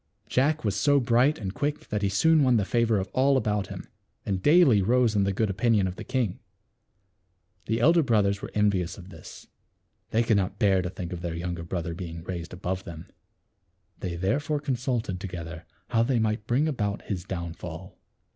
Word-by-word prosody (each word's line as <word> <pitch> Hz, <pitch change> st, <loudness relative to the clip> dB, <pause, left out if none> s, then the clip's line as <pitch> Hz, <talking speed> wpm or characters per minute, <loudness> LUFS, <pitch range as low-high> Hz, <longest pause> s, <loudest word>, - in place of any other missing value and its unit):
Jack 145 Hz, +2 st, +1 dB
was 100 Hz, -2 st, 0 dB
so 140 Hz, +7 st, +3 dB
bright 125 Hz, +4 st, +3 dB
and 95 Hz, -3 st, -5 dB
quick 145 Hz, +3 st, -3 dB
that 105 Hz, -1 st, -1 dB
he 100 Hz, -, +1 dB
soon 160 Hz, +11 st, +4 dB
won 125 Hz, -3 st, +4 dB
the 100 Hz, -, +1 dB
favor 115 Hz, 0 st, +2 dB
of 95 Hz, 0 st, -2 dB
all 135 Hz, +1 st, +3 dB
about 105 Hz, -5 st, 0 dB
him, -, -, -8 dB, 0.4 s
and 95 Hz, -2 st, -1 dB
daily 145 Hz, -, +5 dB
rose 120 Hz, +2 st, +2 dB
in 100 Hz, -1 st, +3 dB
the 100 Hz, -, +1 dB
good 110 Hz, +3 st, 0 dB
opinion 105 Hz, 0 st, +2 dB
of 90 Hz, -1 st, -3 dB
the -, -, -7 dB
king. 120 Hz, -9 st, -1 dB, 1.3 s
The 115 Hz, +1 st, 0 dB
elder 165 Hz, +7 st, +5 dB
brothers 105 Hz, -6 st, +1 dB
were -, -, -6 dB
envious 100 Hz, -4 st, +1 dB
of 95 Hz, -1 st, -11 dB
this. -, -, -12 dB, 0.6 s
They 115 Hz, +1 st, +2 dB
could 110 Hz, -2 st, +3 dB
not 95 Hz, -1 st, -1 dB
bear 100 Hz, -4 st, +3 dB
to 90 Hz, -, -3 dB
think 90 Hz, -1 st, -6 dB
of 85 Hz, -, -6 dB
their 85 Hz, -1 st, -3 dB
younger 85 Hz, 0 st, -4 dB
brother 85 Hz, 0 st, -4 dB
being 85 Hz, -2 st, -7 dB
raised 85 Hz, -2 st, -6 dB
above 90 Hz, +1 st, -4 dB
them. 85 Hz, 0 st, -10 dB, 0.9 s
They 90 Hz, -2 st, -4 dB
therefore 145 Hz, -, 0 dB
consulted 125 Hz, -8 st, -2 dB
together 85 Hz, -3 st, -7 dB, 0.2 s
how 115 Hz, -2 st, +2 dB
they 120 Hz, +2 st, +2 dB
might 110 Hz, -1 st, -1 dB
bring 135 Hz, +6 st, +2 dB
about 105 Hz, -9 st, -2 dB
his 95 Hz, -4 st, -4 dB
down 85 Hz, -3 st, -5 dB
fall. 85 Hz, +2 st, -9 dB
105 Hz, 195 wpm, -27 LUFS, 90-125 Hz, 1.3 s, daily